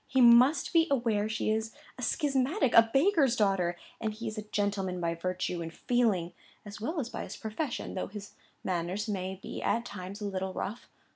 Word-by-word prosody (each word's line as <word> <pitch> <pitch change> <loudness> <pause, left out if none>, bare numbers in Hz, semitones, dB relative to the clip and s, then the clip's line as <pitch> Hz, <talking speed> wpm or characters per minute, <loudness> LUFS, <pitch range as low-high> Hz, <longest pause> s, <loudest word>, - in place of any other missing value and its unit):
He 265 - +1
must 250 +7 +6
be 330 0 +5
aware 225 -6 +1
she 220 0 0
is 220 0 -2 0.2
a - - -9
schismatic; 275 - +1
a 230 0 +7
baker's 280 - +4
daughter; 195 -5 +1 0.2
and 220 -1 -1
he 225 +2 -6
is 215 - -4
a 215 - -4
gentleman 200 -3 -1
by 170 -1 0
virtue 180 0 -3
and 165 0 -5
feeling, 205 -5 +1 0.3
as 205 +1 -9
well 315 +9 -2
as 245 -4 -3
by - - -5
his - - -8
profession, 240 +5 -4
though 185 - -3
his 205 0 -9 0.3
manners 180 +3 -2
may 190 -2 -3
be - - -6
at 235 +1 0
times 195 0 -7
a 210 - -4
little 190 -1 -3
rough. 220 +5 -5
215 Hz, 195 wpm, -30 LUFS, 190-245 Hz, 0.3 s, a